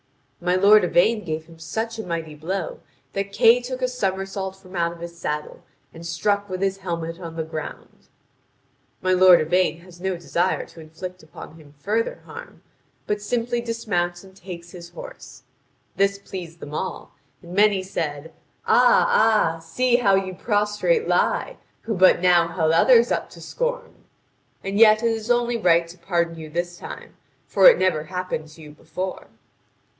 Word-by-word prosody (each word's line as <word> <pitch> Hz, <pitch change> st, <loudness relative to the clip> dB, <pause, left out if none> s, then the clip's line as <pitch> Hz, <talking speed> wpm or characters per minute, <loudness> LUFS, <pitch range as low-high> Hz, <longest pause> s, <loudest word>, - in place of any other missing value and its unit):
My 180 Hz, +1 st, +2 dB
lord 205 Hz, +2 st, +6 dB
Yvain 210 Hz, +5 st, +2 dB
gave 160 Hz, -2 st, -4 dB
him 165 Hz, 0 st, -17 dB
such 225 Hz, +8 st, -4 dB
a -, -, -3 dB
mighty 165 Hz, -4 st, -4 dB
blow 190 Hz, -, -4 dB, 0.3 s
that 195 Hz, 0 st, -3 dB
Kay 230 Hz, +4 st, +5 dB
took 255 Hz, +1 st, -5 dB
a -, -, +3 dB
summersault 195 Hz, -4 st, -3 dB
from 190 Hz, -1 st, -14 dB
out 170 Hz, -1 st, 0 dB
of 170 Hz, -, -11 dB
his 170 Hz, 0 st, -8 dB
saddle 150 Hz, -3 st, -5 dB, 0.3 s
and 165 Hz, -, -11 dB
struck 200 Hz, +5 st, -1 dB
with 185 Hz, +1 st, -3 dB
his 195 Hz, 0 st, 0 dB
helmet 170 Hz, -2 st, -4 dB
on 165 Hz, -2 st, -8 dB
the 160 Hz, -, -2 dB
ground. 160 Hz, -1 st, -8 dB, 1.0 s
My 185 Hz, 0 st, +2 dB
lord 185 Hz, -1 st, +7 dB
Yvain 170 Hz, +1 st, +1 dB
has 175 Hz, 0 st, -16 dB
no 190 Hz, 0 st, -1 dB
desire 175 Hz, +1 st, -1 dB
to -, -, -16 dB
inflict 180 Hz, +3 st, -9 dB
upon 155 Hz, 0 st, -12 dB
him 150 Hz, -2 st, -17 dB
further 215 Hz, +10 st, -2 dB
harm, -, -, -11 dB, 0.4 s
but 210 Hz, 0 st, -2 dB
simply 240 Hz, +2 st, -1 dB
dismounts 200 Hz, -7 st, -2 dB
and 190 Hz, -1 st, -16 dB
takes 175 Hz, -2 st, -10 dB
his 170 Hz, -1 st, -10 dB
horse. -, -, -11 dB, 0.5 s
This 200 Hz, 0 st, +2 dB
pleased 180 Hz, -4 st, -9 dB
them 150 Hz, -, -9 dB
all, -, -, -5 dB, 0.3 s
and 175 Hz, +1 st, -10 dB
many 200 Hz, -1 st, +3 dB
said: 160 Hz, -5 st, -4 dB, 0.3 s
"Ah, 245 Hz, 0 st, +5 dB
ah, 215 Hz, -7 st, +3 dB
see 240 Hz, +10 st, +1 dB
how 200 Hz, -5 st, +3 dB
you 190 Hz, -1 st, -1 dB
prostrate 210 Hz, -, 0 dB
lie, -, -, 0 dB, 0.2 s
who 225 Hz, -, -3 dB
but 185 Hz, -2 st, +5 dB
now 175 Hz, -2 st, +4 dB
held 165 Hz, -1 st, 0 dB
others 235 Hz, +7 st, +5 dB
up -, -, -1 dB
to -, -, -14 dB
scorn! -, -, -3 dB, 0.7 s
And 195 Hz, +1 st, -2 dB
yet 215 Hz, 0 st, +6 dB
it 230 Hz, -, +3 dB
is 225 Hz, 0 st, -4 dB
only 240 Hz, 0 st, +2 dB
right 170 Hz, -5 st, +3 dB
to 175 Hz, +1 st, -13 dB
pardon 170 Hz, -2 st, -1 dB
you 155 Hz, -1 st, -8 dB
this 175 Hz, +2 st, -4 dB
time; -, -, -10 dB, 0.3 s
for -, -, +5 dB
it -, -, +4 dB
never 155 Hz, -5 st, +1 dB
happened 180 Hz, -4 st, -4 dB
to 155 Hz, +1 st, -15 dB
you 150 Hz, -, -11 dB
before." 165 Hz, +5 st, -6 dB
185 Hz, 170 wpm, -23 LUFS, 170-215 Hz, 1.0 s, lord